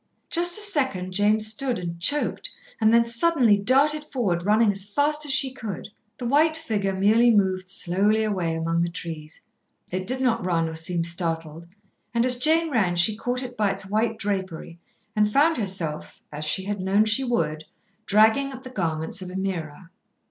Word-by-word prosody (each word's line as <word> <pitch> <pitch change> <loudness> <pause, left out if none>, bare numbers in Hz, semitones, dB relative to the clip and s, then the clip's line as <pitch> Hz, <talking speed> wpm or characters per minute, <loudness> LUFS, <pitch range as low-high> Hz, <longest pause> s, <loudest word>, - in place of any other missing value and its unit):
Just 345 +1 +4
a 425 - +2
second 260 - +1
Jane 205 +3 +3
stood, 225 +4 0
and 170 -1 -6
choked, 295 - -1 0.3
and 220 -1 +3
then 235 0 +4
suddenly 235 -1 +3
darted 275 +9 +2
forward, 215 - -2
running 210 +2 +3
as 195 -1 -2
fast 290 +9 0
as - - -1
she 265 -1 +2
could. 215 -7 -7 0.3
The 245 - -6
white 310 +5 +2
figure 205 -11 -2
merely 220 +5 +4
moved 190 -4 +1
slowly 195 +4 +1
away 185 -6 -1
among 165 +1 -1
the 170 - 0
trees. 160 -3 -7 0.5
It 185 +1 -4
did 255 +2 0
not 235 -5 0
run 170 -2 0
or 160 - -6
seem 165 +1 -1
startled, 165 -1 -4 0.5
and 235 +1 +2
as 250 -1 +2
Jane 320 +3 +2
ran 195 -9 +1
she 175 +5 +4
caught 245 +3 -3
it 250 -1 -8
by 210 -3 +1
its 195 0 -4
white 220 +1 0
drapery, 190 -5 -4 0.4
and 210 0 +2
found 300 +6 +3
herself, 185 -8 -2
as 150 +1 -6
she 190 +5 -2
had 205 +1 -4
known 195 +3 +2
she 220 +5 +1
would, 155 -11 -2 0.4
dragging 220 +7 +3
at 260 0 -10
the 255 - -10
garments 160 -4 -3
of 185 - -7
Ameerah. 180 -3 -5
205 Hz, 180 wpm, -24 LUFS, 180-250 Hz, 0.5 s, Just